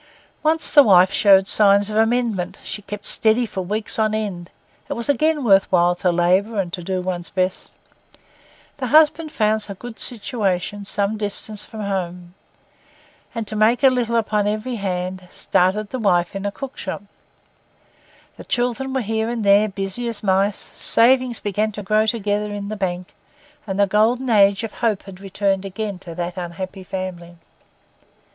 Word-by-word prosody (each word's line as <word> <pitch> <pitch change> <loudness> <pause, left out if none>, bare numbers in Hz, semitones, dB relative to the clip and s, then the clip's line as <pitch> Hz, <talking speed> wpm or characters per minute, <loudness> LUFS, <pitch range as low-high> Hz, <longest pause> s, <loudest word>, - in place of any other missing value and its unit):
Once 315 +1 0
the 290 - +9
wife 185 -6 +5
showed 195 -2 +5
signs 200 0 +4
of - - -4
amendment; 225 -4 0
she 210 - -6
kept 205 0 -8
steady 225 +2 +3
for 195 -4 -5
weeks 210 +5 -3
on 215 0 +1
end; 190 -5 -4 0.4
it - - -1
was 235 - -3
again 300 +2 +1
worth 195 -4 +4
while 175 -1 +4
to 180 0 0
labour 185 +5 +1
and 180 -3 -3
to 180 - -4
do 185 +1 -2
one's 180 -1 -4
best. 185 0 -3 1.0
The 260 -2 -3
husband 310 +3 +4
found 215 -3 +1
a 200 - -6
good 240 +3 -10
situation 205 -4 -2
some 200 +2 0
distance 210 0 -2
from 220 - -9
home, 180 -3 -4 1.0
and, 230 -1 -3
to 215 - -6
make 220 +5 +2
a 265 - +7
little 240 -2 -1
upon 210 -2 +1
every 215 +4 -2
hand, 185 -1 -4
started 195 +5 0
the 260 - -3
wife 175 -4 +1
in 195 +1 -3
a - - -2
cook 270 +5 -8
shop; 190 +1 -5 1.3
the - - -10
children 250 +2 -2
were 265 - +1
here 220 0 -2
and 235 -2 -3
there, 200 +2 +4
busy 195 +4 -3
as 230 -3 -4
mice; 195 +1 +2
savings 250 0 +2
began 210 +2 -1
to 210 - -7
grow 215 +2 +2
together 210 -1 -1
in 205 0 -5
the 215 - -4
bank, 180 -2 -4 0.5
and 190 0 -3
the 200 - +5
golden 230 +5 +1
age 200 -1 +4
of 225 - -5
hope 220 -4 0
had 190 -2 -12
returned 195 0 -1
again 195 0 -5
to 170 -3 -10
that 175 +1 -4
unhappy 185 +2 -6
family. 180 -2 -6
205 Hz, 170 wpm, -21 LUFS, 190-225 Hz, 1.3 s, the